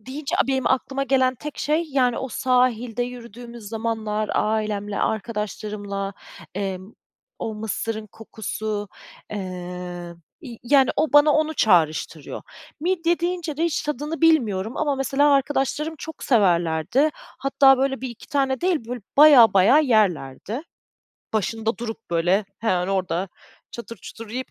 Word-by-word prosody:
deyince, 270 +6 -5
benim 265 -1 0
aklıma 270 +1 0
gelen 260 -1 +2
tek 295 +3 -8
şey, 310 +3 +1
yani, 250 -3 +2
o 265 - -4
sahilde 245 -2 +1
yürüdüğümüz 240 -1 -9
zamanlar 220 -1 -2
ailemle, 210 -1 -1
arkadaşlarımla, 210 -2 -3 0.4
eee, 195 -2 -2 0.6
o 220 - -4
mısırın 220 0 -4
kokusu, 215 -1 -5 0.4
eee, 210 - -4 1.0
ya, 240 -5 -9
yani, 265 +1 +4
o 310 - +1
bana 290 +1 +7
onu 310 +1 +1
çağrıştırıyor. 160 -5 +1 0.4
Midye 345 0 +1
deyince 345 -4 -2
de 325 - 0
hiç 335 -3 0
tadını 300 +2 -4
bilmiyorum 230 - +2
ama 295 -2 +1
mesela 270 +2 +2
arkadaşlarım 280 +3 0
çok 320 -1 -8
severlerdi. 175 - +2
Hatta 270 -1 +2
böyle 270 0 0
1-2 245 -3 -7
tane 270 -2 0
değil, 360 0 +2
böyle 245 0 -4 0.2
bayağı 280 -6 +8
bayağı 230 +11 +6
yerlerdi. 210 - 0 0.7
Başında 220 +1 -1
durup 225 -3 -7
böyle 175 +5 +2
hemen 185 -5 0
orda 190 -1 -1 0.4
çatır 235 -1 -8
çutur 225 +2 -10
yiyip 255 +2 -4
235 Hz, 125 wpm, -23 LUFS, 210-275 Hz, 1.0 s, bayağı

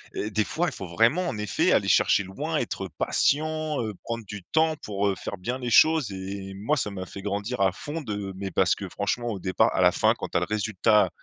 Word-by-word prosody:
heu, 105 - -2
des 110 +1 +2
fois, 175 +9 -1
il 145 - -3
faut 95 - -6
vraiment 115 - +2
en 110 - -4
effet 105 -4 +1
aller - - +3
chercher 100 - +4
loin, 95 +1 -3
être - - -3
patient, 155 -1 +1
heu, 110 -2 -3
prendre 115 -2 -4
du 100 -2 -8
temps 160 - +2
pour, 100 -1 -1
heu, 95 - +1
faire 100 - -6
bien 120 +8 -3
les 120 -2 -4
choses 155 -8 +5
et 95 +1 -6
moi, 105 +10 0
ça 105 -7 -2
m'a 95 -1 -5
fait 100 - -9
grandir 105 +4 -3
à 95 -1 +4
fond 155 - -6
de 100 -5 -4
mais 95 0 -5
parce 95 -1 +3
que 95 -2 -7
franchement, 120 +5 -2
au 105 -5 -3
départ 95 0 +2
à - - +1
la - - +5
fin, - - +3
quand - - -4
tu - - -1
as - - +1
le - - +1
résultat 105 0 +2
105 Hz, 245 wpm, -26 LUFS, 95-125 Hz, -, choses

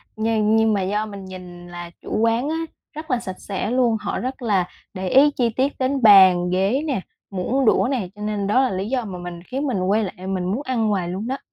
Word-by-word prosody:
nhưng 220 -1 +1
nhưng 220 0 +3
mà 200 - +1
do 205 +3 -1
mình 200 -2 -9
nhìn 180 -2 -10
là 175 -1 -8
chủ - - -3
quán 230 +5 +1
á 320 - -1 0.4
rất 310 -1 -7
là 250 - +2
sạch 185 -6 -7
sẽ 200 +2 -3
luôn. 245 -3 +2
Họ - - -3
rất 260 +1 -4
là 200 -6 +1 0.3
để 185 -1 -3
ý 285 +6 +6
chi 245 -4 0
tiết 265 +5 0
đến 265 +1 0
bàn, 190 -5 +7
ghế 195 +9 +1
nè, 255 -9 -1 0.3
muỗng 230 +8 0
đũa 235 - +4
nè, 230 -10 -2
cho 210 - -12
nên 210 -1 -2
đó 215 +6 +3
là 265 - +1
lý 190 +2 -3
do 250 -2 -1
mà 190 -3 -6
mình 175 -1 -8
khiến 270 +8 -3
mình 245 -8 -1
quay 200 +4 +1
lại 185 -1 -6
mình 190 -2 -2
muốn 200 +9 -1
ăn 240 -5 0
hoài 185 -4 -1
luôn 190 +5 -4
đó. 265 +2 -2
210 Hz, 245 wpm, -22 LUFS, 185-250 Hz, 0.4 s, bàn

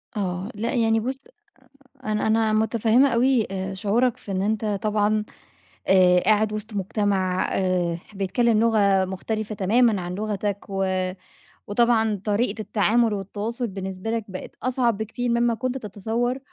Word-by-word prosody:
آه. 185 0 -3
لأ 230 +6 -2
يعني 225 -2 +2
بُصّ، 260 +4 -4 0.8
أنا 215 -1 -1
أنا 220 0 +2
متفهّمة 225 +4 +3
أوي 245 -1 +2
آآ 190 0 -3
شعورك 225 +5 +1
في 200 - -9
إن 185 - -1
أنت 215 +2 -1 0.2
طبعًا 210 0 +1 0.6
آآ 180 -1 +5
قاعد 215 +1 +2
وِسط 215 0 -6
مجتمَع 190 -2 0
آآ 180 -3 0 0.2
بيتكلّم 215 +3 +1
لغة 200 -4 +3
مختلِفة 215 +3 -4
تمامًا 215 +2 +2
عن 175 0 -5
لغتك، 205 0 -3
و 195 0 -1 0.8
وطبعًا 220 -2 +2
طريقة 215 +1 0
التعامُل 220 +2 +2
والتواصُل 210 +5 -4
بالنسبة 190 +1 -5
لك 225 -2 -1
بقِت 185 -1 -7
أصعب 245 -4 +1
بكتير 225 +3 -3
مما 235 0 +2
كنت 255 +3 -3
تتصوّر، 225 +4 -2
215 Hz, 140 wpm, -24 LUFS, 195-230 Hz, 0.8 s, آآ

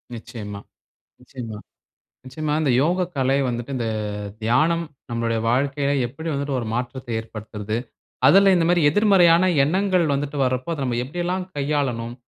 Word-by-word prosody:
நிச்சயமா, 105 -3 -8 0.6
நிச்சயமா, 120 -4 -8 0.7
நிச்சயமா. 150 +4 -3
இந்த 140 - +2
யோக 180 +4 +1
கலை 135 +1 +2
வந்துட்டு. 120 +3 -4
இந்த 115 -3 -2 0.5
தியானம் 155 +9 +2 0.3
நம்மளுடைய 115 -1 -1
வாழ்க்கையில 140 +3 +1
எப்படி 145 +7 -7
வந்துட்டு 140 -1 -2
ஒரு 115 - -5
மாற்றத்தை 125 0 -4
ஏற்படுத்துறது. 110 -1 -6 0.5
அதுல 195 +7 +7
இந்த 170 - +2
மாதிரி 175 -1 +3
எதிர்மறையான 185 -2 +5 0.2
எண்ணங்கள் 185 +3 +2
வந்துட்டு 145 +1 -3
வர்றப்போ. 130 +3 -1
அத 140 - -4
நம்ம 120 -2 -1
எப்படில்லாம் 175 +6 -3
கையாளனும். 135 -5 -1
140 Hz, 130 wpm, -22 LUFS, 120-165 Hz, 0.7 s, அதுல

